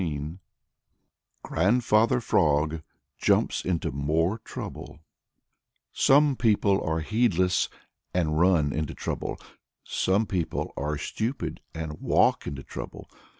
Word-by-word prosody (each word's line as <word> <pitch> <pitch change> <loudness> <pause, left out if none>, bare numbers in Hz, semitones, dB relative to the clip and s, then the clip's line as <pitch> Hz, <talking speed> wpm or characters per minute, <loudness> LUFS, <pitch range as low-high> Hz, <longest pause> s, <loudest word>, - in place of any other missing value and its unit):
XIX 75 -1 -3 1.1
GRANDFATHER 110 +5 +2
FROG 80 -5 +2 0.4
JUMPS - - +2
INTO 90 -3 -1
MORE 80 - 0
TROUBLE - - -8 1.0
Some 145 0 +4
people 105 -4 +2
are 80 0 -1
heedless 95 -2 +2 0.4
and 80 -3 0
run 85 -5 +3
into 75 -1 -3
trouble. - - -4 0.5
Some 100 +4 +1
people 90 -5 -2
are 75 +2 -2
stupid 110 - -3
and 80 -1 -5
walk - - +2
into 70 -1 -5
trouble. - - -8
85 Hz, 105 wpm, -27 LUFS, 75-105 Hz, 1.1 s, Some